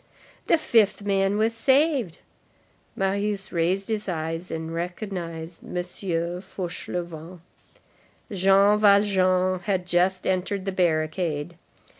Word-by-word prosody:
The 335 Hz, -, +5 dB
fifth 220 Hz, -10 st, +2 dB
man 195 Hz, 0 st, +1 dB
was 220 Hz, +2 st, +1 dB
saved. 265 Hz, -, +2 dB, 0.8 s
Marius 200 Hz, +1 st, -1 dB
raised 180 Hz, +3 st, 0 dB
his 215 Hz, -2 st, -2 dB
eyes 165 Hz, +1 st, -3 dB
and 160 Hz, 0 st, -5 dB
recognized 170 Hz, -2 st, -5 dB
M. -, -, -9 dB
Fauchelevent. 175 Hz, -1 st, -4 dB, 0.9 s
Jean 195 Hz, +2 st, +4 dB
Valjean 185 Hz, -3 st, +3 dB
had 180 Hz, 0 st, -1 dB
just 180 Hz, +1 st, +1 dB
entered 190 Hz, +1 st, -1 dB
the 195 Hz, -, -1 dB
barricade. 160 Hz, -2 st, -1 dB
185 Hz, 100 wpm, -25 LUFS, 170-200 Hz, 0.9 s, The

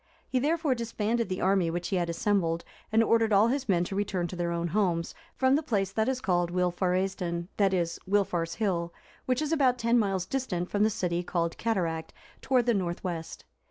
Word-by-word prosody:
He 255 Hz, -, 0 dB
therefore 310 Hz, +1 st, +1 dB
disbanded 230 Hz, -2 st, -1 dB
the 185 Hz, -, -3 dB
army 190 Hz, -2 st, +2 dB
which 175 Hz, +1 st, -3 dB
he 195 Hz, -, 0 dB
had 175 Hz, -1 st, 0 dB
assembled, 170 Hz, -2 st, 0 dB, 0.3 s
and 225 Hz, +1 st, +4 dB
ordered 225 Hz, -1 st, +3 dB
all 210 Hz, +3 st, +5 dB
his 270 Hz, -1 st, -2 dB
men 175 Hz, -3 st, +3 dB
to 195 Hz, -, -5 dB
return 195 Hz, -3 st, -1 dB
to -, -, -6 dB
their 175 Hz, -1 st, -1 dB
own 170 Hz, 0 st, -1 dB
homes, 175 Hz, -3 st, 0 dB, 0.2 s
from 260 Hz, 0 st, +3 dB
the 295 Hz, -, +3 dB
place 200 Hz, -9 st, -1 dB
that 220 Hz, +4 st, 0 dB
is 260 Hz, -1 st, -2 dB
called 175 Hz, -6 st, +1 dB
Wilfaraesdun,(361) 180 Hz, -1 st, 0 dB
that 200 Hz, -2 st, +3 dB
is, 170 Hz, -3 st, -1 dB
Wilfar's 175 Hz, -5 st, +1 dB
Hill, 175 Hz, -6 st, -1 dB, 0.4 s
which 255 Hz, +3 st, +1 dB
is 305 Hz, -, -2 dB
about 265 Hz, -6 st, +3 dB
ten 235 Hz, 0 st, +3 dB
miles 195 Hz, -4 st, 0 dB
distant 185 Hz, -7 st, -3 dB
from 205 Hz, -, 0 dB
the 215 Hz, -, +5 dB
village 175 Hz, -4 st, -2 dB
called 170 Hz, -1 st, -1 dB
Cataract, 170 Hz, -8 st, -1 dB, 0.3 s
towards 255 Hz, -3 st, +2 dB
the 240 Hz, -, +3 dB
north 175 Hz, -4 st, -2 dB
west. 165 Hz, -3 st, -5 dB
195 Hz, 200 wpm, -28 LUFS, 175-230 Hz, 0.4 s, all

